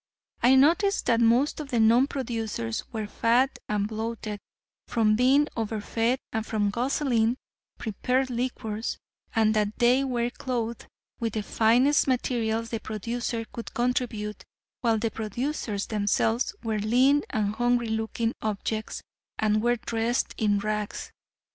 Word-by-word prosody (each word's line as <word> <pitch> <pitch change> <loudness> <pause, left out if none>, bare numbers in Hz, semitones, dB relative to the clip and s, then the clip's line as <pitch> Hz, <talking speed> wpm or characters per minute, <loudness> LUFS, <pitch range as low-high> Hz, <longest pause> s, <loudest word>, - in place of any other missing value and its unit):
I 250 +3 +6
noticed 345 +9 +4
that 230 -1 +3
most 240 +7 +3
of 295 -3 -6
the 240 - +1
non 230 +4 +5
producers 225 - -3
were 220 -2 -3
fat 240 +5 +1
and 205 -1 0
bloated 220 -1 -4 0.5
from 215 -2 +2
being 265 +5 +4
over 220 -1 -2
fed 230 +4 0 0.2
and 220 -1 -1
from 210 -2 0
guzzling 240 -1 +1 0.4
prepared 250 +4 -1
liquors, 235 -3 -3 0.4
and 220 -1 +4
that 210 0 0
they 250 +2 +4
were 245 -2 -1
clothed 235 -3 -4 0.3
with 230 -2 -2
the 215 - -2
finest 250 +9 +3
materials 230 -3 0
the 225 - -2
producer 230 +2 -3
could 230 - -8
contribute, 235 -4 -1 0.4
while 230 -2 +2
the 220 +1 -1
producers 220 -1 -3
themselves 220 +3 0
were 220 -2 -1
lean 255 +7 +4
and 210 -1 0
hungry 240 -1 +2
looking 220 +1 -1
objects, 215 +1 -3 0.3
and 215 0 +2
were 240 +1 +2
dressed 230 +1 -1
in 210 -2 +2
rags. 210 0 -3
230 Hz, 135 wpm, -27 LUFS, 215-245 Hz, 0.5 s, I